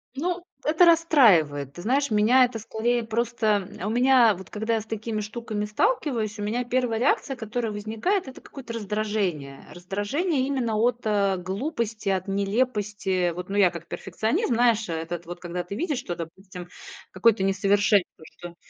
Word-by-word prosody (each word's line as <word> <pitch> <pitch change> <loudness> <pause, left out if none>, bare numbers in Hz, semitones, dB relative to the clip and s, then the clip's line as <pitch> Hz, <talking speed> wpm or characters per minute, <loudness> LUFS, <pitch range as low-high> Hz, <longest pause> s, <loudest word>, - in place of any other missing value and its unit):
Ну, 350 +4 -2 0.2
это 315 +4 +4
расстраивает. 205 - +4
Ты 175 - -9
знаешь, 270 +5 +1
меня 230 +5 +5
это 235 -2 -5
скорее 235 +2 -1
просто 220 -3 0
м 195 - -3
У - - -1
меня, 245 -2 +5
вот 185 -2 -11
когда 220 +2 -1
я 220 - -1
с - - -12
такими 220 0 -4
штуками 215 -1 -4
сталкиваюсь, 225 - 0
у 205 - -4
меня 235 +4 -1
1 245 -2 0
реакция, 270 +1 +1
которая 225 -1 -3
возникает- 225 - -2
это 260 - -10
какое-то 245 -4 -10
раздражение. 205 -10 -3
Раздражение 205 - -1
именно 245 -6 -1
от, 240 +2 +2
э, 200 -3 +1
глупости, 215 - -3
от 190 0 -1
нелепости. 200 -3 0
Вот, 180 +2 -7
ну, 200 - -2
я 185 -4 +5
как 170 - -9
перфекционизм, 225 - -1
знаешь, 230 -2 +2
этот 165 +1 -4
вот, 175 +1 -8
когда 175 0 -4
ты 190 +3 -7
видишь, 295 - -2
что, 175 -7 -4
допустим, 175 +2 -9 0.4
какое-то 200 +2 +3
несовершенство, 200 -2 +2
что 175 -1 -9
215 Hz, 165 wpm, -25 LUFS, 190-245 Hz, 0.4 s, меня